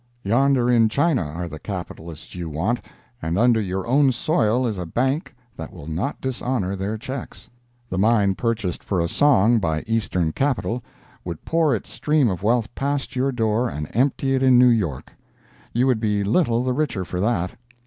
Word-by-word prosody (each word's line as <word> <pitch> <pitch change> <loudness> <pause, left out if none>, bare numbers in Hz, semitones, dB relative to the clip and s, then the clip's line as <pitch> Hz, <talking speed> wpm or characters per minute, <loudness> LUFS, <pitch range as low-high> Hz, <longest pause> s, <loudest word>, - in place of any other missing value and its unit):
Yonder 125 +4 +3
in 115 -3 +4
China 145 - +2
are 85 +3 -4
the 80 -2 -8
capitalists 85 -4 -7
you 85 -2 -5
want—and 95 - -4
under 115 0 +4
your 95 -1 -3
own 135 +2 +4
soil 120 -2 +1
is 110 -5 -2
a 90 - -3
bank 130 - -1 0.2
that 80 - -7
will 85 -5 -11
not 85 - -3
dishonor 125 -6 -2
their 100 +3 -3
checks. 130 +2 -7 0.4
The 95 - -3
mine 105 -2 +3
purchased 105 -3 -2
for 95 - -1
a 85 - +1
song 120 - +4
by 80 -5 -1
Eastern 100 -7 0
capital 125 - -1 0.4
would 85 -3 -7
pour 160 -5 +2
its 105 - -7
stream 150 -5 +2
of 90 - -4
wealth 115 +2 +1
past 140 0 -2
your 130 +2 +1
door 115 0 0
and 75 -4 -5
empty 135 +2 +1
it 130 - +1
in 130 -2 +5
New 125 0 +7
York. 90 - -1 0.6
You 120 +2 +2
would 125 -4 +2
be 105 -2 0
little 120 - +2
the 130 0 0
richer 125 -10 -1
for 90 +1 -4
that. 95 -3 0
115 Hz, 180 wpm, -22 LUFS, 95-130 Hz, 0.6 s, New